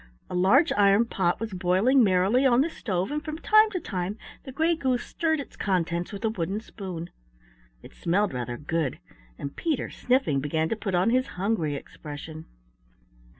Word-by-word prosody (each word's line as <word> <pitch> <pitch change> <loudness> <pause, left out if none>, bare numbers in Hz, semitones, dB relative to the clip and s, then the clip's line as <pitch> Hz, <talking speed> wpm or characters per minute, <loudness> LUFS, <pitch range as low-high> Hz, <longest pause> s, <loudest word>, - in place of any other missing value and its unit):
A - - -4
large 195 - +4
iron 205 -1 +4
pot 175 -6 0
was 225 -3 -5
boiling 190 +9 +3
merrily 195 +6 +3
on 255 -2 +5
the 325 +4 0
stove 190 - -2
and 300 +1 -2
from 310 0 -5
time 430 +5 +5
to 380 -4 -3
time 190 - -4 0.3
the 265 - -7
Gray 320 +5 +1
Goose 260 -6 0
stirred 315 -2 -1
its 280 - -8
contents 175 -2 -1
with 205 +2 -5
a - - +3
wooden 195 -1 -2
spoon. 185 -6 -7 0.7
It - - -13
smelled 190 +1 0
rather 120 -1 -4
good, 155 -1 -2 0.4
and 140 - -6
Peter, 315 -6 -2
sniffing, 250 - +1
began 160 +3 -1
to - - 0
put 200 -4 -3
on 185 +6 +3
his 255 +2 +2
hungry 180 -7 0
expression. 155 +2 -9
200 Hz, 175 wpm, -26 LUFS, 175-255 Hz, 0.7 s, on